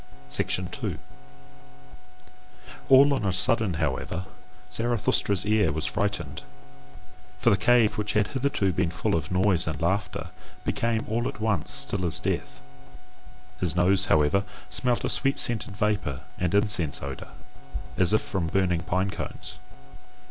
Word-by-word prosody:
2. 90 Hz, +6 st, -2 dB, 1.9 s
All 140 Hz, +2 st, +7 dB
on 135 Hz, -, -2 dB
a 100 Hz, -, +1 dB
sudden 100 Hz, 0 st, +1 dB
however, 80 Hz, +4 st, -3 dB, 0.5 s
Zarathustra's 115 Hz, -4 st, 0 dB
ear 105 Hz, -1 st, +2 dB
was 80 Hz, +1 st, -2 dB
frightened: 105 Hz, -1 st, -2 dB, 1.0 s
for 120 Hz, -, +2 dB
the -, -, +5 dB
cave 110 Hz, +1 st, +3 dB
which 105 Hz, 0 st, -2 dB
had 105 Hz, -1 st, +1 dB
hitherto 130 Hz, -8 st, -1 dB
been 90 Hz, 0 st, 0 dB
full 85 Hz, -, -2 dB
of 80 Hz, -2 st, -3 dB
noise 90 Hz, -2 st, +2 dB
and 80 Hz, -2 st, -3 dB
laughter, 95 Hz, +6 st, -2 dB, 0.3 s
became 115 Hz, -1 st, -1 dB
all 115 Hz, +2 st, -1 dB
at 105 Hz, -, -7 dB
once 105 Hz, -8 st, -1 dB
still 65 Hz, +8 st, +2 dB
as 85 Hz, -3 st, +5 dB
death; -, -, -3 dB, 1.0 s
his 85 Hz, -3 st, -2 dB
nose, 95 Hz, +2 st, +3 dB
however, 75 Hz, +6 st, +2 dB, 0.3 s
smelt 125 Hz, -2 st, 0 dB
a -, -, 0 dB
sweet 135 Hz, 0 st, 0 dB
scented 110 Hz, -4 st, +4 dB
vapour 105 Hz, -11 st, -1 dB, 0.2 s
and 90 Hz, +1 st, 0 dB
incense 100 Hz, -10 st, +4 dB
odour, 65 Hz, -1 st, -7 dB, 0.7 s
as 90 Hz, -2 st, +2 dB
if 110 Hz, -, +2 dB
from 90 Hz, -4 st, -3 dB
burning 90 Hz, -2 st, 0 dB
pine 95 Hz, +3 st, -1 dB
cones. -, -, -7 dB
100 Hz, 135 wpm, -26 LUFS, 85-110 Hz, 1.9 s, All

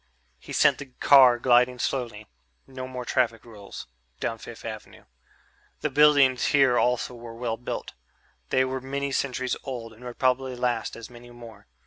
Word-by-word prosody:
He -, -, -12 dB
sent -, -, +3 dB
the 140 Hz, -, -8 dB
car 130 Hz, -4 st, +7 dB
gliding 125 Hz, +1 st, +3 dB
slowly... 120 Hz, -5 st, -3 dB, 0.4 s
no 130 Hz, -1 st, -8 dB
more 125 Hz, -1 st, -6 dB
traffic 120 Hz, -3 st, 0 dB
rules... 105 Hz, -4 st, -10 dB, 0.3 s
down 115 Hz, -1 st, -3 dB
Fifth 115 Hz, 0 st, -11 dB
Avenue. 110 Hz, -2 st, -9 dB, 0.8 s
The -, -, -1 dB
buildings 140 Hz, -4 st, +5 dB
here 135 Hz, -3 st, +4 dB
also 125 Hz, 0 st, 0 dB
were 115 Hz, -1 st, -10 dB
well 115 Hz, -1 st, -3 dB
built; 120 Hz, -, -6 dB, 0.6 s
they 130 Hz, 0 st, +2 dB
were 130 Hz, 0 st, -4 dB
many 140 Hz, +1 st, -3 dB
centuries 130 Hz, -2 st, -1 dB
old 120 Hz, -4 st, -6 dB
and 115 Hz, +3 st, -16 dB
would 125 Hz, -1 st, -8 dB
probably 130 Hz, 0 st, +1 dB
last 120 Hz, -2 st, -2 dB
as 115 Hz, +1 st, -10 dB
many 120 Hz, 0 st, -13 dB
more. 115 Hz, -4 st, -13 dB
125 Hz, 160 wpm, -26 LUFS, 115-130 Hz, 0.8 s, car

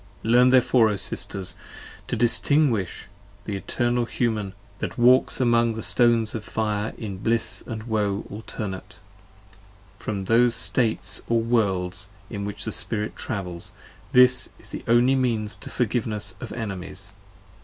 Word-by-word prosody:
Learn 125 Hz, +3 st, +5 dB
therefore, 125 Hz, -3 st, +4 dB
O 105 Hz, -, -1 dB
Sisters, 95 Hz, 0 st, -1 dB, 0.5 s
to -, -, -2 dB
distinguish 120 Hz, -, +2 dB, 0.4 s
the 105 Hz, -, -4 dB
Eternal 120 Hz, +4 st, -1 dB
Human 110 Hz, -5 st, -2 dB, 0.3 s
That -, -, -5 dB
walks 125 Hz, +2 st, +4 dB
about -, -, +1 dB
among 115 Hz, -1 st, +3 dB
the 110 Hz, -, -5 dB
stones 115 Hz, -3 st, +3 dB
of 110 Hz, -, -5 dB
fire, 105 Hz, 0 st, -2 dB
in 100 Hz, -4 st, -6 dB
bliss 115 Hz, +2 st, 0 dB
& -, -, -19 dB, 0.2 s
woe 105 Hz, -2 st, -1 dB
Alternate, 95 Hz, -3 st, -7 dB, 1.0 s
from 100 Hz, -3 st, -4 dB
those 115 Hz, +3 st, +4 dB
States 115 Hz, -4 st, +2 dB
or 115 Hz, 0 st, +3 dB
Worlds 100 Hz, -5 st, 0 dB, 0.2 s
in 100 Hz, -2 st, -4 dB
which 105 Hz, -, -4 dB
the -, -, -3 dB
Spirit 105 Hz, -1 st, 0 dB
travels: 90 Hz, -7 st, -4 dB, 0.3 s
75 -, -, -25 dB
This 125 Hz, 0 st, +6 dB
is -, -, -12 dB
the -, -, -7 dB
only 120 Hz, +3 st, +4 dB
means 115 Hz, -5 st, 0 dB
to -, -, -9 dB
Forgiveness 105 Hz, -4 st, -1 dB
of -, -, -7 dB
Enemies. 100 Hz, -2 st, -6 dB
110 Hz, 145 wpm, -24 LUFS, 100-120 Hz, 1.0 s, This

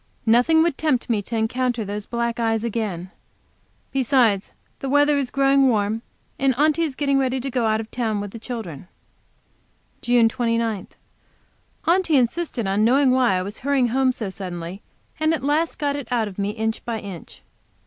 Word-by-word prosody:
Nothing 250 Hz, +8 st, +4 dB
would 335 Hz, -5 st, -1 dB
tempt 260 Hz, -6 st, 0 dB
me 215 Hz, -3 st, +1 dB
to 230 Hz, -, -6 dB
encounter 240 Hz, +1 st, 0 dB
those 205 Hz, +1 st, -5 dB
black 235 Hz, -1 st, -2 dB
eyes 225 Hz, -1 st, +1 dB
again. 205 Hz, -6 st, -3 dB, 0.8 s
Besides, 245 Hz, -6 st, +2 dB, 0.3 s
the 270 Hz, -, -4 dB
weather 290 Hz, +1 st, +4 dB
is 275 Hz, -3 st, -1 dB
growing 275 Hz, 0 st, +4 dB
warm, 215 Hz, 0 st, 0 dB, 0.4 s
and 270 Hz, -2 st, +2 dB
Aunty 305 Hz, +3 st, +3 dB
is 305 Hz, -5 st, -1 dB
getting 280 Hz, -1 st, +1 dB
ready 260 Hz, 0 st, 0 dB
to 270 Hz, +2 st, -4 dB
go 240 Hz, -2 st, +1 dB
out 215 Hz, 0 st, +1 dB
of 220 Hz, 0 st, -7 dB
town 225 Hz, -4 st, -1 dB
with 205 Hz, -1 st, -5 dB
the 230 Hz, -, -8 dB
children. 215 Hz, -, -7 dB, 1.1 s
JUNE 240 Hz, -1 st, +4 dB
29. 230 Hz, -4 st, -1 dB, 1.0 s
Aunty 340 Hz, -3 st, +3 dB
insisted 250 Hz, -1 st, 0 dB
on 195 Hz, +2 st, +1 dB
knowing 260 Hz, +3 st, +4 dB
why 255 Hz, -6 st, +3 dB
I 185 Hz, -, 0 dB
was 205 Hz, +3 st, -7 dB
hurrying 270 Hz, -3 st, +1 dB
home 260 Hz, +2 st, +2 dB
so 220 Hz, -6 st, -5 dB
suddenly, 180 Hz, -1 st, -6 dB, 0.4 s
and 315 Hz, +1 st, +2 dB
at 265 Hz, -, -7 dB
last 305 Hz, +4 st, +1 dB
got 285 Hz, -2 st, -1 dB
it 285 Hz, -3 st, -5 dB
out 235 Hz, -3 st, +1 dB
of 200 Hz, -1 st, -9 dB
me 200 Hz, 0 st, 0 dB
inch 220 Hz, +1 st, -3 dB
by 235 Hz, -2 st, -3 dB
inch. 195 Hz, -6 st, -10 dB
240 Hz, 180 wpm, -22 LUFS, 215-275 Hz, 1.1 s, Nothing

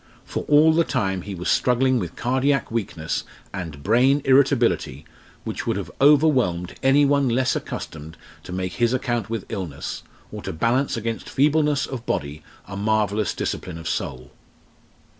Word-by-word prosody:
For -, -, -4 dB
all 155 Hz, +2 st, +5 dB
the 165 Hz, +1 st, +4 dB
time 95 Hz, -, -1 dB
he 100 Hz, +1 st, -6 dB
was 90 Hz, +1 st, -5 dB
struggling 130 Hz, +1 st, +2 dB
with 85 Hz, -5 st, -5 dB
cardiac 130 Hz, +1 st, 0 dB
weakness 95 Hz, -8 st, -3 dB, 0.3 s
and 80 Hz, -6 st, -6 dB
brain 130 Hz, +6 st, +3 dB
irritability 130 Hz, -, +2 dB, 0.4 s
which -, -, -5 dB
would -, -, 0 dB
have -, -, -5 dB
overwhelmed 135 Hz, -, +3 dB
any 135 Hz, +2 st, +4 dB
one 140 Hz, -2 st, +2 dB
less 130 Hz, +2 st, +1 dB
accustomed 80 Hz, +1 st, -6 dB, 0.3 s
to -, -, -8 dB
make 90 Hz, 0 st, -3 dB
his 120 Hz, +1 st, +1 dB
account 120 Hz, -4 st, -2 dB
with 115 Hz, -4 st, -3 dB
illness, 85 Hz, -9 st, -5 dB, 0.3 s
or -, -, -7 dB
to -, -, -5 dB
balance 120 Hz, -, +1 dB
against 115 Hz, 0 st, -4 dB
feebleness 150 Hz, 0 st, +2 dB
of 125 Hz, -3 st, -7 dB
body 70 Hz, +2 st, -2 dB, 0.2 s
a 100 Hz, -, -8 dB
marvellous 105 Hz, 0 st, 0 dB
discipline 90 Hz, -3 st, -4 dB
of 80 Hz, -1 st, -7 dB
soul. 65 Hz, -4 st, -4 dB
115 Hz, 155 wpm, -23 LUFS, 90-135 Hz, 0.4 s, all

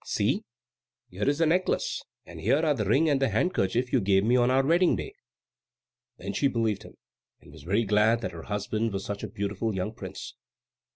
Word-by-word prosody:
See, -, -, 0 dB, 0.7 s
here 100 Hz, +8 st, 0 dB
is 145 Hz, -, 0 dB
your 165 Hz, 0 st, +3 dB
necklace, 180 Hz, +3 st, 0 dB, 0.2 s
and -, -, -11 dB
here 155 Hz, +4 st, +2 dB
are 150 Hz, -, +3 dB
the 110 Hz, -7 st, -2 dB
ring 135 Hz, +11 st, +3 dB
and 140 Hz, -3 st, +2 dB
the 135 Hz, -, +3 dB
handkerchief 125 Hz, -, 0 dB
you -, -, +4 dB
gave 95 Hz, 0 st, +3 dB
me 120 Hz, +4 st, +3 dB
on 120 Hz, 0 st, +3 dB
our 135 Hz, +1 st, +3 dB
wedding 170 Hz, +4 st, +4 dB
day." 405 Hz, -, -6 dB, 1.0 s
Then -, -, -5 dB
she 140 Hz, -, +2 dB
believed 115 Hz, -5 st, -1 dB
him, -, -, -14 dB, 0.4 s
and -, -, -17 dB
was 75 Hz, +1 st, -13 dB
very 100 Hz, +9 st, +1 dB
glad 110 Hz, +2 st, +3 dB
that 95 Hz, -, -3 dB
her 85 Hz, -2 st, -8 dB
husband 105 Hz, +2 st, -1 dB
was 100 Hz, 0 st, -3 dB
such 100 Hz, 0 st, -4 dB
a 110 Hz, -, -4 dB
beautiful 100 Hz, +1 st, -3 dB
young 95 Hz, +4 st, -3 dB
prince. -, -, -8 dB
110 Hz, 205 wpm, -27 LUFS, 100-135 Hz, 1.0 s, you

